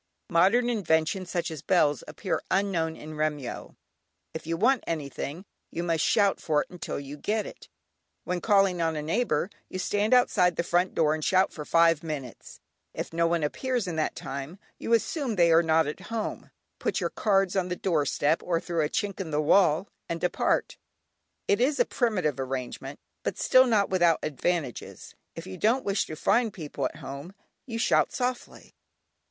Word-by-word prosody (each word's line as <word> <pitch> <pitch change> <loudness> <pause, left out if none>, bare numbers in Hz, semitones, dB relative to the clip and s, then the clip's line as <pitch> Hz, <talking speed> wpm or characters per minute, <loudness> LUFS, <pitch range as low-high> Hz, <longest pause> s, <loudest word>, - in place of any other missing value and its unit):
Modern 195 +9 +4
inventions 180 -4 0
such 175 -2 -2
as 155 -3 -6
bells 150 -6 +2
appear 160 +5 -3
unknown 180 -5 0
in 155 +1 -9
Remyo. 150 -4 -3 0.6
If 160 - -7
you 165 0 -1
want 250 +6 +3
anything 155 +2 -4 0.2
you 170 - -4
must 165 -2 0
shout 200 -3 +3
for 150 -2 +1
it - - -23
until 180 -5 -5
you 140 +1 -8
get 210 +7 -1
it. - - -11 0.5
When 180 -1 -2
calling 195 -4 +3
on 165 -1 0
a 150 - -3
neighbour 185 0 0 0.2
you - - -5
stand 205 +3 0
outside 180 -8 +3
the 170 - 0
front 175 +2 +1
door, 155 -2 +3
and 155 0 -4
shout 190 +3 +3
for 150 - -7
five 165 -1 +4
minutes, 150 -7 -7 0.4
if - - -5
no 170 0 +2
one 170 -1 0
appears 245 - -1
in 175 -3 -4
that 155 - -1
time, 140 +6 -6 0.2
you - - -4
assume 245 +1 0
they 170 -3 +4
are 165 +1 +6
not 160 -1 +3
at 150 +4 -5
home, 225 -2 -4 0.3
put - - -1
your - - -2
cards 195 -3 +1
on 185 -2 +1
the 180 - -2
doorstep 155 -3 +1
or 170 -2 0
through 170 -2 -1
a 150 - -1
chink 205 +1 -2
in 185 -4 -4
the 150 -1 0
wall, 165 +2 +4 0.2
and 170 - -2
depart. 180 - 0 0.7
It 205 - +2
is 275 +2 +2
a 245 - +5
primitive 185 - 0
arrangement, 130 -1 -5 0.2
but - - -3
still, 255 0 +5
not 210 -5 +2
without 175 -3 +4
advantages. 155 -2 -3 0.2
If - - -7
you 95 - -8
don't 240 +5 +2
wish 200 0 0
to 155 - -6
find 230 +8 +2
people 155 -6 -5
at - - -3
home, 140 +8 -8 0.3
you 230 -2 -4
shout 230 - +2
softly. 250 -1 -4
170 Hz, 180 wpm, -27 LUFS, 155-200 Hz, 0.7 s, are